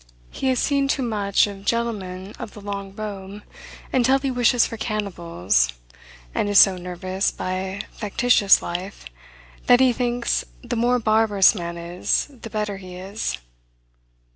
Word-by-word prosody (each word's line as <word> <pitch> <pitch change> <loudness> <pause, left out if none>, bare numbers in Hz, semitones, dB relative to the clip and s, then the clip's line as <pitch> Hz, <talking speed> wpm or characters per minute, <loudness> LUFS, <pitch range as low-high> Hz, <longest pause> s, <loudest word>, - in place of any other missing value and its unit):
He 270 - -3
has 260 -1 +2
seen 280 +2 +1
too 275 -1 0
much 205 -4 +2
of 200 -1 -8
gentlemen 205 -4 -2
of - - -8
the - - -9
long 200 -1 -6
robe, 205 -1 -7 0.5
until 260 +1 +4
he 275 -1 -2
wishes 245 -1 +3
for - - -5
cannibals; 170 - -1 0.6
and 205 - 0
is 205 - +3
so 195 -1 +8
nervous, 180 +2 -2
by 190 +1 -4
factitious 210 -1 +3
life, 180 - -5 0.6
that 245 - +7
he 260 -2 +5
thinks, 240 0 0 0.2
the - - -3
more 240 +2 +2
barbarous 215 -3 +4
man 170 -4 -5
is, 175 - -1
the 240 -4 -10
better 210 -2 -3
he 185 -2 -10
is. 195 +4 -4
205 Hz, 145 wpm, -23 LUFS, 185-235 Hz, 0.6 s, so